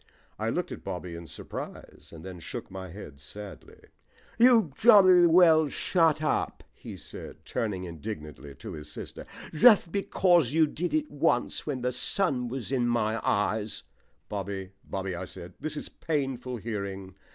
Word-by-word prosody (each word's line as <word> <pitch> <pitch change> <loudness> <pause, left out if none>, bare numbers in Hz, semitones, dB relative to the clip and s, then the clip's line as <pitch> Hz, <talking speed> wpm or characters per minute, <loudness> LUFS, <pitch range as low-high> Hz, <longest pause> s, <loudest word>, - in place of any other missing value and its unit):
I - - 0
looked - - -2
at - - -7
Bobby 90 -2 -5
in 85 0 -9
surprise - - -9
and 80 +1 -11
then 95 -2 -8
shook 80 - -7
my 95 -1 -7
head 80 -6 -10
sadly. 105 +6 -11 0.6
"You 230 - +6
jolly 185 -5 +7
well 165 -2 +6
shut 160 +1 +2
up," 155 - -1
he - - -9
said, - - -11
turning 100 -5 -2
indignantly 75 -5 -7
to - - -8
his 75 -1 -8
sister. - - -8 0.3
"Just 180 +1 +6
because 175 -7 +3
you 160 0 +5
did 175 - -2
it 310 -1 -1
once - - 0
when 135 -4 -2
the 125 +1 0
sun 125 0 0
was 130 0 -5
in 125 -3 +1
my 115 -1 0
eyes 105 +1 0 0.2
" - - -42
"Bobby, 100 -1 -5
Bobby," 95 -1 -4
I 90 +1 -4
said, 90 0 -9
"this 155 -1 -3
is - - -5
painful 135 -5 -3
hearing. 100 -4 -5
120 Hz, 160 wpm, -28 LUFS, 95-160 Hz, 0.6 s, jolly